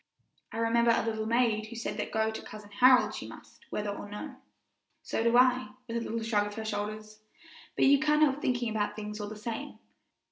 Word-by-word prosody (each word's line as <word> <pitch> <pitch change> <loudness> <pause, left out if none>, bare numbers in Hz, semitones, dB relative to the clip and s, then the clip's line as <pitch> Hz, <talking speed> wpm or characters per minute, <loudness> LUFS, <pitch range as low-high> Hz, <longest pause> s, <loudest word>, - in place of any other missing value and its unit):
I - - -6
remember 230 +1 +3
a - - 0
little 220 -1 -2
maid 225 -2 +1
who 235 - -9
said 230 - -4
that - - -3
go 220 0 +1
to 220 - -6
Cousin 210 -1 -11
Harold 250 +4 +5
she - - -6
must, - - -14
whether 210 -1 -2
or 205 0 -7
no." 255 +6 -7 0.7
"So - - -2
do 235 +1 +4
I," 255 0 +3
with 230 - -5
a 235 - 0
little 230 0 -3
shrug 210 -2 +1
of 205 - -8
her 220 - -5
shoulders; 215 0 -4 0.6
"but - - +3
you 280 0 +6
can't 300 +1 +3
help 285 -1 +2
thinking 245 -6 0
about 210 -1 -1
things, 210 0 -6
all 205 - -4
the 215 - -7
same. 230 +7 -6
225 Hz, 215 wpm, -30 LUFS, 215-250 Hz, 0.7 s, you